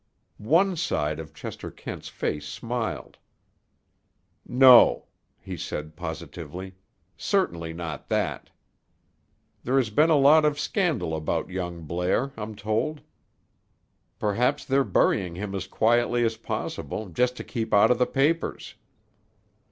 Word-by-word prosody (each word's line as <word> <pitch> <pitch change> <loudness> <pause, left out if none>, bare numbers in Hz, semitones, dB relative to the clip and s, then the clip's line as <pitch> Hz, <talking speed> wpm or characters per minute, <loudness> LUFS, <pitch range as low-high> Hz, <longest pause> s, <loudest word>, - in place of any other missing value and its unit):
One 175 - +3
side 80 - -1
of 80 -1 -8
Chester - - -7
Kent's - - -8
face 75 -1 -3
smiled. 115 +6 -4 1.3
"No," 125 -1 +7 0.5
said 75 - -4
he 75 - -15
positively, 90 +3 -7 0.4
"certainly 85 -1 -1
not 80 -3 -6
that." - - -1 1.1
"There 130 +3 +1
has 120 -5 +1
been 150 +9 +4
a 160 - +5
lot 145 +3 +6
of 150 -1 +1
scandal 155 - 0
about 80 +3 -2
young 85 -2 -4
Blair, 90 - -1
I'm 110 0 -6
told. 110 +9 -2 1.2
Perhaps 110 +4 0
they're 135 +1 +2
burying 90 -8 +1
him 100 +2 -5
as 95 -1 -4
quietly 120 +3 +2
as 115 0 0
possible 110 -2 -5
just 125 +8 0
to - - -5
keep 115 -3 -4
out 105 +3 +5
of 125 - +2
the 125 - +3
papers." 150 +5 0
110 Hz, 125 wpm, -26 LUFS, 90-130 Hz, 1.3 s, No